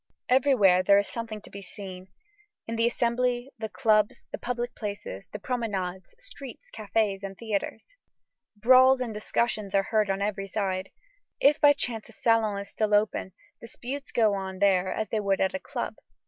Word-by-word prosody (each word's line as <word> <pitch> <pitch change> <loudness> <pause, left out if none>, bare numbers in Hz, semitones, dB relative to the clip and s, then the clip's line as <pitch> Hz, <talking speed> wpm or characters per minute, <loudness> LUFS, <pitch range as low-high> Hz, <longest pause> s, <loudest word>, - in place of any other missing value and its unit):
Everywhere 245 -9 +5
there 200 +2 +5
is 200 - +2
something 225 -2 -5
to - - -14
be 200 - -8
seen; 185 -1 -9 0.6
in 230 - -4
the 230 +1 +3
Assembly, 245 +2 0
the 220 -1 -4
clubs, 215 -4 +2
the - - -5
public 245 0 -3
places, 200 - -6
the - - -5
promenades, 195 -6 -3
streets, 285 - -10
cafés, 210 -2 0
and 195 -1 -7
theatres. 220 - -4 0.6
Brawls 255 +4 +6
and 245 -3 -3
discussions 210 -1 -1
are 195 - +4
heard 215 -1 +1
on 195 0 0
every 200 -1 -2
side. 190 -2 -2 0.5
If 295 +2 +4
by 290 -1 +8
chance 230 -5 -3
a - - -15
salon 220 -2 +2
is 200 0 -6
still 210 -1 +1
open, 205 -3 0 0.3
disputes 255 +4 -7
go 220 -3 +3
on 190 -1 -4
there 190 -1 +3
as 220 - -2
they 220 - 0
would 200 -2 +1
at 190 - +1
a 280 - -2
club. - - -4
215 Hz, 175 wpm, -27 LUFS, 195-240 Hz, 0.6 s, by